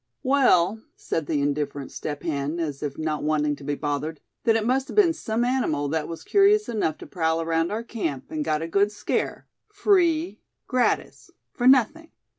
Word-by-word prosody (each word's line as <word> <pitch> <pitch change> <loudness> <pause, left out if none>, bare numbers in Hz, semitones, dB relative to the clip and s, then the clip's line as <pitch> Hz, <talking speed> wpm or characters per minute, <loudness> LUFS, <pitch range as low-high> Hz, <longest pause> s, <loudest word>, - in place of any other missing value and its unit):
"Well," 225 -7 +3
said 160 -3 -3
the 145 -3 0
indifferent 145 -1 -2
Step 145 -1 -5
Hen, 150 0 -2
as 150 -4 -3
if 145 -2 -4
not 155 -1 -2
wanting 150 -1 +1
to - - -13
be 145 +1 -2
bothered, 145 +1 -3 0.3
"then 225 -2 +4
it 220 -1 +1
must 260 +2 +1
have - - -8
been 385 -6 +5
some 230 -4 -1
animal 200 - 0
that 155 0 -1
was 165 - -7
curious 415 +1 +4
enough 200 -9 -1
to - - -10
prowl 160 -2 0
around 165 +1 0
our 220 +2 -2
camp, 185 - -4
and 310 -1 -2
got 155 - -1
a - - -3
good 200 +4 +2
scare, 210 0 -2 0.3
free, 365 -5 +2 0.2
gratis, 250 -2 -1 0.2
for 245 - 0
nothing." 275 +6 +4
170 Hz, 185 wpm, -25 LUFS, -, 0.3 s, been